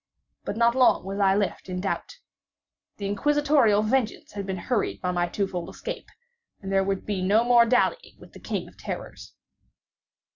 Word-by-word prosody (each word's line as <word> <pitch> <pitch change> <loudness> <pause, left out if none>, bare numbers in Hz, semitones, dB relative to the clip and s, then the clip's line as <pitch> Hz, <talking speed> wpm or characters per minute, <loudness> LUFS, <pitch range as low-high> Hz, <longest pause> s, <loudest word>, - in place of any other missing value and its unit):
But 205 - -4
not 235 0 +4
long 255 -7 +4
was 195 +1 -4
I 195 -1 +4
left 200 -1 -2
in 180 0 -3
doubt. 195 - -3 0.8
The 200 - -5
Inquisitorial 270 0 +3
vengeance 230 0 -1
had 200 -1 -6
been 190 -1 -3
hurried 220 +4 -1
by 180 -2 -1
my 175 -1 0
two 200 +3 -1
fold 180 -3 -5
escape, - - -7 0.5
and 195 -1 -6
there 195 0 +3
was 195 0 0
to - - -16
be 200 -3 -3
no 205 +5 +3
more 240 -1 +5
dallying 255 - +1
with - - -16
the - - -12
King - - -4
of - - -18
Terrors. - - -7
205 Hz, 185 wpm, -25 LUFS, 195-245 Hz, 0.8 s, more